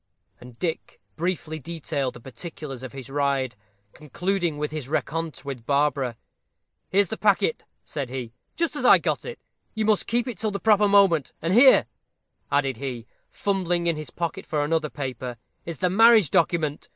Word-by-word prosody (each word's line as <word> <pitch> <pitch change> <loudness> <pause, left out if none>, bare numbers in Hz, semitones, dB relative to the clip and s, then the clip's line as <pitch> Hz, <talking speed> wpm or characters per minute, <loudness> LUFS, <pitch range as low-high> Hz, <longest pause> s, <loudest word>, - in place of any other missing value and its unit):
And 125 -1 -13
Dick 165 +1 -4 0.2
briefly 165 -2 -3
detailed 145 -3 -3
the - - -9
particulars 135 +2 -8
of 130 - -7
his 135 -3 -8
ride, 135 -2 0 0.4
concluding 175 +2 -2
with 150 0 -3
his 155 -4 -5
rencontre 160 0 -3
with 125 -5 -6
Barbara. 140 -4 +1 0.7
"Here's 195 -1 +3
the 220 - -3
packet," 215 - +2 0.2
said 140 -4 -4
he, 125 -3 -6 0.2
"just 335 -2 -1
as 290 - -3
I - - +8
got - - -2
it. 480 0 -6 0.4
You 220 -1 0
must 215 -2 +2
keep 240 +2 0
it 230 -8 -5
till 220 - 0
the 200 -1 -4
proper 210 -1 +4
moment. 195 -7 +4
And 165 +3 -1
here," 260 +4 +7 0.7
added 135 -4 +1
he, 125 -3 -5 0.2
fumbling 180 -4 -1
in 170 -1 +2
his 155 0 -7
pocket 170 -2 -4
for 150 -1 0
another 155 0 0
paper, 130 -4 -5 0.3
"is 170 -3 -5
the 180 - +1
marriage 225 - +6
document. 155 -4 +1
155 Hz, 170 wpm, -25 LUFS, 135-195 Hz, 0.7 s, I